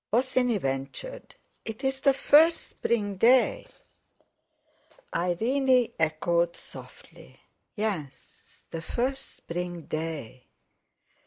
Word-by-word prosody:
Bosinney 250 -1 +2
ventured: 135 - -5 0.3
"It's 265 +4 -3
the 275 -1 +4
first 315 +4 +5
spring 205 -4 -1
day." 255 - +4 1.5
Irene 245 +8 +2
echoed 170 +2 +1
softly: - - -12 0.4
"Yes—the 170 - -6
first 260 +9 -3
spring 175 0 -5
day." 155 -7 -5
215 Hz, 75 wpm, -27 LUFS, 165-260 Hz, 1.5 s, first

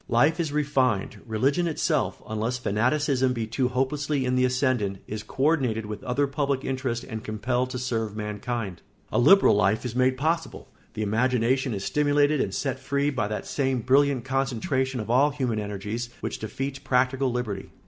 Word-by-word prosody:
Life 145 +8 +3
is 160 -4 -1
refined; 135 -8 0
religion 135 +10 +1
itself, 160 - -1
unless 110 +3 -2
fanaticism 130 +4 +1
be 115 -2 -2
too 125 +3 0
hopelessly 135 +2 -1
in 125 - 0
the 125 0 +3
ascendant, 125 -6 0
is 105 0 -5
co 135 - -4
ordinated 130 -8 +2
with 105 0 -6
other 130 +3 +1
public 140 -1 -1
interests 130 -3 -2
and 110 -3 -6
compelled 120 +4 -1
to 130 - -4
serve 115 -4 -2
mankind; 105 -2 -4 0.3
a - - +2
liberal 195 +11 +6
life 105 +3 +2
is 120 -1 -4
made 130 0 +2
possible; 165 +4 -2 0.3
the 110 - -2
imagination 125 +3 +1
is 100 - -4
stimulated 145 0 +2
and - - -2
set 135 -2 -2
free 140 +2 0
by 130 -7 -1
that 105 0 -4
same 135 -3 0
brilliant 135 0 +3
concentration 130 0 -1
of 110 +1 -3
all 135 +4 +5
human 130 -6 -2
energies 105 +3 -4
which - - -4
defeats 135 +5 -4
practical 130 0 +1
liberty. 110 -6 -3
125 Hz, 170 wpm, -26 LUFS, 110-140 Hz, 0.3 s, liberal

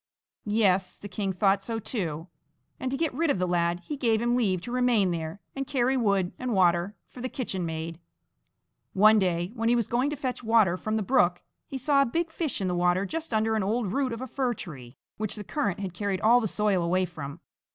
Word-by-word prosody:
Yes, 195 -3 +2
the 205 - -8
king 195 0 -2
thought 195 +1 +2
so 225 +2 -3
too, 175 - -3 0.5
and 260 - -2
to 270 - -2
get 325 -2 0
rid 320 +4 0
of 280 - +2
the 180 0 0
lad 175 0 +1
he 295 - -5
gave 230 -5 +2
him 240 +1 +1
leave 200 -7 +1
to 240 - -7
remain 245 -7 +3
there 165 +2 -4 0.2
and 275 -1 -3
carry 265 -2 +1
wood 200 -7 +1
and 255 -2 -2
water 175 +2 +3
for 250 - -11
the 255 - -3
kitchenmaid. 165 - -4 0.9
One 215 +2 +6
day, 175 -1 0
when 230 -1 0
he 240 - +4
was 235 -2 +1
going 250 +4 +1
to 295 - -3
fetch 255 -3 -4
water 220 -6 +4
from 215 +4 -3
the 220 - 0
brook, 185 -7 +2 0.2
he 270 - -5
saw 280 +1 +3
a 275 - +3
big 330 +6 -1
fish 320 -3 -2
in 190 - -1
the 180 - 0
water 180 +2 +2
just 325 - -4
under 220 0 +1
an 215 - +1
old 210 +1 0
root 270 -2 0
of 230 +1 -5
a 260 - -4
fir 255 -1 -1
tree, 135 -10 -9 0.2
which 215 -1 -3
the 210 - -6
current 200 - -2
had 190 -3 -4
carried 195 0 -2
all 240 +3 +5
the 220 - 0
soil 210 -2 +1
away 185 +2 +2
from. 150 -3 -8
210 Hz, 225 wpm, -27 LUFS, 180-245 Hz, 0.9 s, One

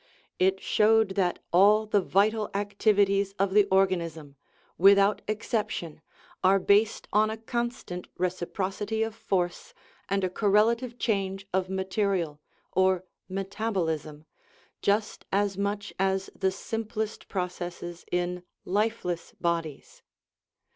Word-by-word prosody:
It 190 +1 +3
showed 220 +1 +3
that 190 -2 0 0.2
all 205 +4 +6
the 210 -1 +2
vital 210 +4 +2
activities 200 -1 +2
of 195 0 +1
the 205 -1 +6
organism 170 -6 0 0.4
without 200 +2 +5
exception 210 -7 -3 0.4
are 190 +1 +5
based 205 +3 +2
on 215 +1 +4
a 220 - -4
constant 235 -5 -4
" - - -33
reciprocity 190 +4 -2
of 225 0 -3
force 180 -5 -2 0.2
" - - -33
and 195 0 0
a 185 - +1
correlative 230 +5 +2
change 195 -4 -1
of 185 0 0
material, 190 -5 -1 0.3
or 185 -1 +2 0.3
metabolism, 185 -6 -3 0.6
just 210 +2 0
as 200 0 +1
much 205 +1 -3
as 190 0 0
the 190 - +1
simplest 220 +2 -4
processes 175 -2 -5
in 180 0 -1
" - - -61
lifeless 200 -3 -1
" - - -48
bodies. 165 -4 -3
195 Hz, 120 wpm, -27 LUFS, 180-210 Hz, 0.6 s, all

